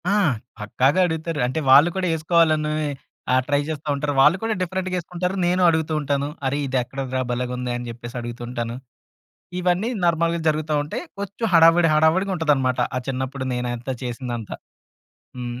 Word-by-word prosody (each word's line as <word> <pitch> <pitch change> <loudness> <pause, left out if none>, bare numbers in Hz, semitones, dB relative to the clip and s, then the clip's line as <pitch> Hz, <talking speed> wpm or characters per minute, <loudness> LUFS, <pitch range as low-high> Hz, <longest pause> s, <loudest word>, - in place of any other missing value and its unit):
ఆ! - - +2 0.5
పక్కాగా 130 - +1
అడుగుతారు. 160 -1 -3
అంటే 130 +5 -2
వాళ్ళు 145 +6 +8
కూడా 185 -1 0
యేసుకోవాలని 155 -1 +2 0.6
ఆహ్, 130 0 +4
ట్రై 145 0 +2
జేస్తా 155 -1 -5
ఉంటారు. 145 +1 -2
వాళ్ళు 150 +7 +6
కూడా 225 0 0
డిఫరెంట్‌గా 185 +1 -2
యేసుకుంటారు. 180 +2 -3
నేనూ 180 +1 +2
అడుగుతూ 160 -1 0
ఉంటాను 140 -1 -1 0.2
అరె! 135 +2 0
ఇది 130 0 -1
ఎక్కడిదిరా? 130 0 -4
భలేగ 125 0 -2
ఉందే! 125 0 -3
అని 120 0 -6
జెప్పేసి 120 +1 -8
అడుగుతూ 120 0 -7
ఉంటాను. 120 -1 -4 0.9
ఇవన్నీ 180 +5 +1
నార్మల్‌గా 170 0 +1
జరుగుతా 155 0 0
ఉంటాయి. 150 - -5 0.2
కొంచెం 200 +3 -3
హడావిడి 165 0 +6
హడావిడిగా 165 +6 +3
ఉంటదన్నమాట 135 -6 +1 0.2
ఆ - - 0
చిన్నప్పుడు 130 0 -3
నేనంతా 125 +1 -3
చేసిందంతా 120 -2 -5 0.8
హ్మ్. 120 -1 -5
150 Hz, 155 wpm, -22 LUFS, 125-170 Hz, 0.9 s, వాళ్ళు